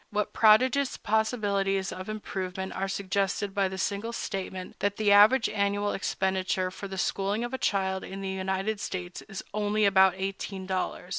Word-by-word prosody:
What 210 0 -2
prodigious 250 +5 +4
possibilities 205 -3 0
of 185 +2 -7
improvement 190 -3 -4
are 195 +1 -2
suggested 195 +1 -1
by 195 -1 +2
the 190 0 -6
single 205 +4 -2
statement 190 -4 -5
that 205 0 0
the 210 -2 +2
average 215 +5 +7
annual 205 0 0
expenditure 190 -1 -1
for 200 +2 -7
the 190 0 -7
schooling 200 +4 0
of 240 +1 -4
a 260 - -2
child 190 -1 0
in 195 +1 -7
the 195 - -4
United 190 +2 -2
States 180 -2 -5
is 195 -3 -8
only 210 0 +1
about 190 -1 +5
eighteen 195 0 -4
dollars! 185 -1 -3
195 Hz, 165 wpm, -28 LUFS, 190-210 Hz, -, average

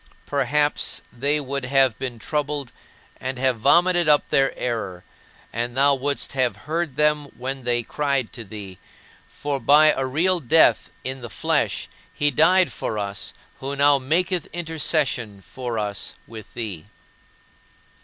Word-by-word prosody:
Perhaps 145 +2 0
they 140 +5 +1
would 140 -1 -3
have 135 -2 +3
been 125 -3 -4
troubled, 145 +1 -3 0.5
and 130 0 -4
have 130 -2 +1
vomited 175 +6 +4
up 145 -1 +4
their 135 0 +3
error, 105 -7 -3 0.5
and 120 +2 -3
thou 140 +1 +5
wouldst 140 +1 -1
have 130 -3 0
heard 160 -2 -2
them 150 0 +2
when 130 +1 -4
they 120 -1 +1
cried 140 -2 -1
to 120 - -7
thee; 100 -3 -9 0.5
for 145 -1 -3
by 150 +5 +6
a 135 - -1
real 175 +7 +2
death 160 +3 +4
in 130 0 -3
the 120 - -7
flesh 100 - 0 0.2
He 145 0 +1
died 165 +2 +4
for 110 - -4
us 100 -1 -3 0.2
who 135 +1 -4
now 140 0 +5
maketh 170 +6 0
intercession 155 - -1
for 120 +4 -6
us 105 -2 -3
with 110 -2 -11
thee. 100 -9 -5
135 Hz, 145 wpm, -23 LUFS, 120-150 Hz, 0.5 s, by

